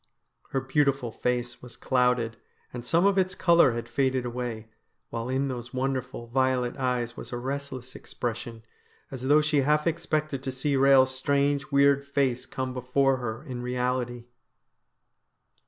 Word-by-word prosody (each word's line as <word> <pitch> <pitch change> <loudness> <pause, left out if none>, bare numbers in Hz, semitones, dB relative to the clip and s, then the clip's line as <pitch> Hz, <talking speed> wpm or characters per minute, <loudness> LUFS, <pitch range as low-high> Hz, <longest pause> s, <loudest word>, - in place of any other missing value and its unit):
Her 135 - 0
beautiful 135 -2 +1
face 120 +1 -2
was 125 -1 -11
clouded, 125 -3 +1 0.4
and 120 -1 -6
some 165 +9 +2
of 200 -1 +4
its 185 0 0
colour 170 -8 +5
had 120 0 -4
faded 130 -2 0
away, 120 -3 -5 0.4
while 115 +1 -3
in 135 +2 0
those 120 -2 -6
wonderful, 130 -2 -2
violet 130 0 +1
eyes 125 -3 -1
was - - -8
a 120 - -3
restless 130 0 -5
expression, 115 -1 -5 0.5
as 130 -1 -5
though 150 +2 +6
she 150 -1 +2
half 150 +2 +2
expected 155 -4 -1
to 135 - -4
see 135 +3 -1
Eehel's 135 -1 +5
strange, 140 +1 0
weird 140 0 +4
face 135 -3 0
come 130 -1 -4
before 130 +2 +1
her 115 0 -5
in 125 -5 -6
reality. 125 -1 -2
130 Hz, 150 wpm, -27 LUFS, 125-140 Hz, 0.5 s, though